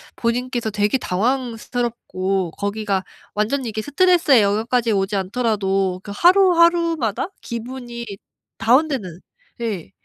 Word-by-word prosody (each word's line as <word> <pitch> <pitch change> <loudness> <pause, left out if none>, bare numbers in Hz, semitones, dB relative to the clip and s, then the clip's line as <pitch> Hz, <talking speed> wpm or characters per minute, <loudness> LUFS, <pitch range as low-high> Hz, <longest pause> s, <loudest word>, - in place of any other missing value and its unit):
본인께서 240 0 -1
되게 210 +3 +1
당황스럽고 225 -5 -2
거기가 200 -1 -2 0.3
완전히 235 +4 -1
이게 215 0 -3
스트레스의 325 - +4
영역까지 225 +4 +1
오지 195 +1 0
않더라도 195 -3 0
그 200 - -8
하루 370 - +5
하루마다 335 - +2
기분이 235 0 -6 0.5
다운되는 235 - +1 0.4
예. 200 - -4
230 Hz, 295 characters per minute, -21 LUFS, 200-260 Hz, 0.5 s, 하루